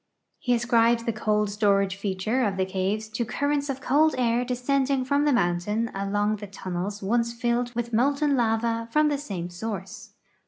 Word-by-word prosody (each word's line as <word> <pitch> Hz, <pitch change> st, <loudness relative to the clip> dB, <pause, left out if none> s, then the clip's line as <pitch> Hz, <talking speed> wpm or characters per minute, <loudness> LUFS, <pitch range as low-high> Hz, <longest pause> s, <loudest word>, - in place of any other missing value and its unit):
He 245 Hz, -1 st, +1 dB
ascribes 235 Hz, 0 st, +3 dB
the 230 Hz, -, -1 dB
cold 210 Hz, -1 st, 0 dB
storage 200 Hz, -2 st, +2 dB
feature 200 Hz, +5 st, -1 dB
of 200 Hz, -4 st, 0 dB
the 190 Hz, -, +1 dB
caves 195 Hz, +3 st, -2 dB
to 220 Hz, +2 st, -2 dB
currents 285 Hz, +4 st, -1 dB
of 270 Hz, -1 st, -3 dB
cold 305 Hz, +3 st, +3 dB
air 240 Hz, -1 st, +2 dB
descending 260 Hz, +2 st, 0 dB
from 285 Hz, +2 st, +2 dB
the 295 Hz, -, +3 dB
mountain 210 Hz, +1 st, 0 dB
along 205 Hz, +2 st, 0 dB
the 205 Hz, 0 st, -8 dB
tunnels 195 Hz, +1 st, -5 dB
once 235 Hz, +3 st, +1 dB
filled 240 Hz, 0 st, -1 dB
with 235 Hz, 0 st, -3 dB
molten 280 Hz, +5 st, +2 dB
lava 230 Hz, -1 st, 0 dB
from 305 Hz, +2 st, +3 dB
the 290 Hz, -1 st, -1 dB
same 180 Hz, -11 st, -5 dB
source. 195 Hz, +1 st, -7 dB
230 Hz, 170 wpm, -26 LUFS, 200-250 Hz, -, ascribes